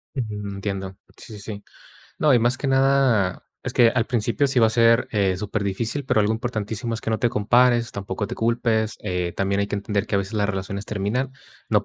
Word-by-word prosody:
Ujú, 105 -5 -4
entiendo. 95 -1 -4 0.2
Sí, 110 - -11
sí, 105 - -9
sí. 100 0 -7 0.6
No, 150 - +4
y 125 - +6
más 120 +3 +2
que 140 - -4
nada, 135 -8 +2 0.2
es - - -3
que 120 - +5
al 115 -1 0
principio 120 +3 +1
sí 130 -2 +1
va 115 - +6
a 110 - +1
ser, 115 +1 +4
eh, 95 -3 +1
superdifícil, 105 +6 -2
pero 125 - +1
algo 105 +1 +2
importantísimo 110 0 -3
es 110 - -5
que 110 - -3
no 110 - 0
te 120 - +3
compares, 120 +2 +3
tampoco 100 0 -4
te - - -5
culpes, 115 -1 0
eh, 90 -3 -2
también 100 +1 0
hay 100 - 0
que 105 - -2
entender 100 0 -1
que - - -3
a - - +3
veces 100 +3 -4
las 100 -1 +1
relaciones 100 0 -4
terminan 110 +6 -2 0.4
no - - +2
110 Hz, 220 wpm, -23 LUFS, 100-120 Hz, 0.6 s, y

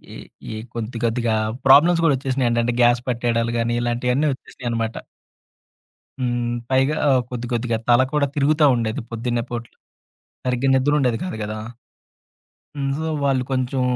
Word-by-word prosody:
ఈ - - -7 0.4
ఈ - - -5 0.2
కొద్ది 115 0 -5
కొద్దిగా 115 -1 0 0.3
ప్రాబ్లమ్స్ 165 +5 +6
కూడా 155 -4 +4
వచ్చేసినాయంటండి 120 -3 0
గ్యాస్ 120 0 +4
పట్టేయడాలు 115 -1 0
గాని 115 +1 0
ఇలాంటివన్నీ 125 +4 0
వచ్చేసినాయి 125 -1 -8
అన్నమాట. 115 -1 -2 1.2
హ్మ్. 120 -1 -1 0.2
పైగా 135 +3 +2 0.3
కొద్దికొద్దిగా 120 -1 -2
తల 120 +1 +6
కూడా 150 -1 +2
తిరుగుతా 150 +1 +3
ఉండేది 115 -1 -2
పొద్దున్నే 120 +1 -2
పూట్ల 120 -1 -6 0.7
సరిగ్గా 125 +1 +1
నిద్ర 135 +3 +2
ఉండేది 125 -4 +1
కాదు 180 - -4
గదా. 110 +1 -5 1.2
హ్మ్. 140 -1 -1
సో 160 - -2 0.2
వాళ్ళు 135 -2 +2
కొంచెం 130 0 0
120 Hz, 135 wpm, -21 LUFS, 115-135 Hz, 1.2 s, ప్రాబ్లమ్స్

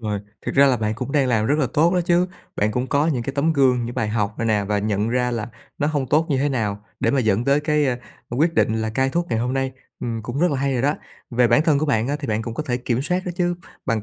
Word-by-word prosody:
Rồi, 105 -3 -2 0.3
thực - - -2
ra 140 0 +6
là 130 - +3
bạn 110 -1 -1
cũng 130 +4 -5
đang 140 -3 +3
làm 110 -2 +2
rất 145 +3 +2
là 135 - +2
tốt 165 +4 +4
đó 180 - +3
chứ. 175 +1 +2 0.3
Bạn 105 +1 +1
cũng 125 +3 -1
có 145 +3 +2
những 130 -7 0
cái 140 - -4
tấm 155 +3 +2
gương, 130 -5 +3
những 120 - -5
bài 110 - -1
học 105 -1 -1
này 115 - -1
nè 105 -2 +2
và 105 +1 0
nhận 105 +1 0
ra 125 +1 +1
là 115 0 -3 0.3
nó 145 - +1
hông 145 -4 -1
tốt 155 +5 +3
như 135 - +2
thế 145 +2 +1
nào 105 -5 -2 0.2
để 115 - +2
mà 135 - +2
dẫn 110 -1 +1
tới 140 +2 +3
cái, 150 -1 +1
a, 125 -1 0 0.3
quyết 160 +7 +1
định 110 - +2
là 110 - -2
cai 130 +3 +1
thuốc 170 +3 -1
ngày 115 - +1
hôm 125 +2 -1
nay. 135 0 -1 0.3
Ừm, 115 -2 -3
cũng 120 +5 -4
rất 175 0 +3
là 140 - 0
hay 140 0 0
rồi 125 -1 0
đó. 145 +2 +2 0.4
Về 120 -1 +3
bản 150 - +4
thân 155 -3 +3
của 155 - 0
bạn 115 -3 +1
á 145 - 0
thì 140 - -5
bạn 110 0 0
cũng 115 0 -5
có 155 - -2
thể 125 -5 -1
kiểm 125 0 -1
soát 180 +5 0
đó 180 - -2
chứ, 175 -1 +1 0.3
bằng 115 -3 0
130 Hz, 310 wpm, -22 LUFS, 115-145 Hz, 0.4 s, ra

